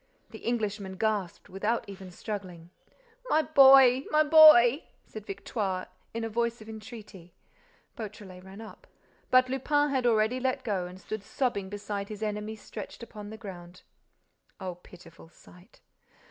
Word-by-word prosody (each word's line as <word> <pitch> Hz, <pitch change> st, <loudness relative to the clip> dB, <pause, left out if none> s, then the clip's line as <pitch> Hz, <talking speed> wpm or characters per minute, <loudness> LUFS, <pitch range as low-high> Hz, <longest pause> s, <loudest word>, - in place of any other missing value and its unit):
The -, -, -10 dB
Englishman 210 Hz, -4 st, -3 dB
gasped, 205 Hz, -4 st, -2 dB
without 210 Hz, +5 st, -2 dB
even 190 Hz, -1 st, -10 dB
struggling. 180 Hz, -3 st, -7 dB, 0.6 s
"My 315 Hz, -, +3 dB
boy—my 270 Hz, 0 st, +6 dB
boy—" 300 Hz, -4 st, +7 dB, 0.2 s
said 215 Hz, -1 st, -10 dB
Victoire, 195 Hz, -1 st, -4 dB, 0.2 s
in 230 Hz, 0 st, -4 dB
a -, -, -2 dB
voice 235 Hz, +1 st, -2 dB
of 215 Hz, -, -13 dB
entreaty. 215 Hz, -5 st, -11 dB, 0.6 s
Beautrelet 200 Hz, -4 st, -9 dB
ran 190 Hz, +3 st, -11 dB
up. 220 Hz, -, -13 dB, 0.4 s
But 255 Hz, 0 st, +5 dB
Lupin 290 Hz, +3 st, +1 dB
had 260 Hz, -3 st, +1 dB
already 225 Hz, +2 st, +2 dB
let 260 Hz, +1 st, -1 dB
go 195 Hz, -6 st, -2 dB
and 180 Hz, +1 st, -12 dB
stood 215 Hz, +2 st, -6 dB
sobbing 200 Hz, -3 st, -2 dB
beside 205 Hz, 0 st, -5 dB
his 215 Hz, 0 st, -7 dB
enemy 210 Hz, +1 st, -4 dB
stretched 215 Hz, +1 st, -9 dB
upon 210 Hz, -3 st, -10 dB
the 220 Hz, -, -9 dB
ground. 180 Hz, -4 st, -11 dB, 0.8 s
O 185 Hz, -1 st, -5 dB
pitiful 170 Hz, -2 st, -16 dB
sight! 180 Hz, +4 st, -20 dB
215 Hz, 140 wpm, -28 LUFS, 190-240 Hz, 0.8 s, boy